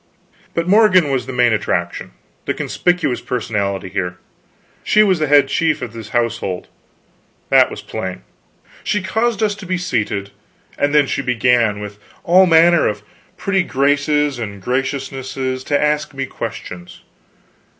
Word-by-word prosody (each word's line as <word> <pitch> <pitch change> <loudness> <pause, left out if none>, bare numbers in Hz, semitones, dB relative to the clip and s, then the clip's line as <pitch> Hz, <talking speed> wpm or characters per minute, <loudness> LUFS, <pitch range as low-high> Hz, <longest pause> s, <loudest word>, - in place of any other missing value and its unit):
But 170 0 -1
Morgan 185 -6 +5
was 130 -2 -1
the - - -4
main 125 -2 +3
attraction, 85 -5 -2 0.3
the - - -1
conspicuous 175 -8 0
personality 100 -5 -2
here; 90 -1 -3 0.7
she 215 - +4
was 190 -5 +2
head 145 -2 +4
chief 160 +3 +1
of 115 - -6
this 115 -2 -9
household, 115 -6 -2 0.8
that - - +5
was - - -8
plain. 95 -1 -6 0.6
She 210 -2 -1
caused 220 +2 0
us 210 -1 +2
to 205 -1 -10
be 185 0 0
seated, 110 - -2 0.4
and 145 +1 0
then 150 -1 +5
she 135 - -2
began, 120 -4 +2
with 105 0 -8 0.2
all 185 +2 +5
manner 170 0 +5
of 105 -1 -3 0.3
pretty 195 -1 +1
graces 145 -2 +1
and 100 -3 -6
graciousnesses, 130 +2 -3
to 145 - +1
ask 150 -1 0
me 135 0 -2
questions. 90 -8 -8
135 Hz, 140 wpm, -18 LUFS, 110-165 Hz, 0.8 s, Morgan